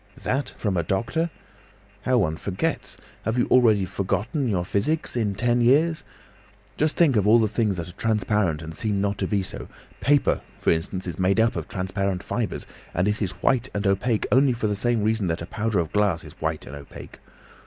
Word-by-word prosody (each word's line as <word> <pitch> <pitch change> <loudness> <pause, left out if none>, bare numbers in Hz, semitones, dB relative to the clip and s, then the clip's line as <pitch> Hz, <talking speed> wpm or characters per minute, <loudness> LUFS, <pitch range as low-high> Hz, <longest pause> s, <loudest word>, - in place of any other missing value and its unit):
"That 135 +2 -1
from 100 -4 -1
a - - +3
doctor! 115 - -1 0.8
How 130 -1 +3
one 85 -8 +1
forgets! 95 +3 -3 0.3
Have 110 +3 -1
you 120 - +3
already 110 -6 +5
forgotten 105 - -1
your 90 -6 0
physics, 125 - -1
in 105 -5 0
ten 120 +3 +2
years? 155 +7 +3 0.7
Just 155 +1 +1
think 155 -7 +4
of 105 -2 +2
all 110 +2 +7
the 110 -2 +3
things 105 -2 0
that 85 -1 -4
are - - -11
transparent 105 -6 0
and 80 0 -7
seem 105 +3 -1
not 100 0 -1
to - - 0
be 100 -2 0
so. - - -6 0.3
Paper, 145 0 +2 0.2
for - - +2
instance, 90 +3 -2
is 90 -1 -5
made 95 +3 +2
up 115 0 +3
of - - -4
transparent 95 0 -2
fibres, - - -3 0.3
and 90 +3 +2
it 105 +1 -1
is 95 -4 -1
white 130 -1 +2
and 100 0 -1
opaque 100 +4 +1
only 130 0 +5
for 115 -2 -3
the 105 - +1
same 115 +1 +1
reason 110 -2 +1
that 80 0 -2
a - - -5
powder 110 +3 -1
of 85 -3 0
glass 100 -5 +2
is - - -11
white - - -2
and 70 - -8
opaque. 70 -1 -11
105 Hz, 205 wpm, -24 LUFS, 95-120 Hz, 0.8 s, all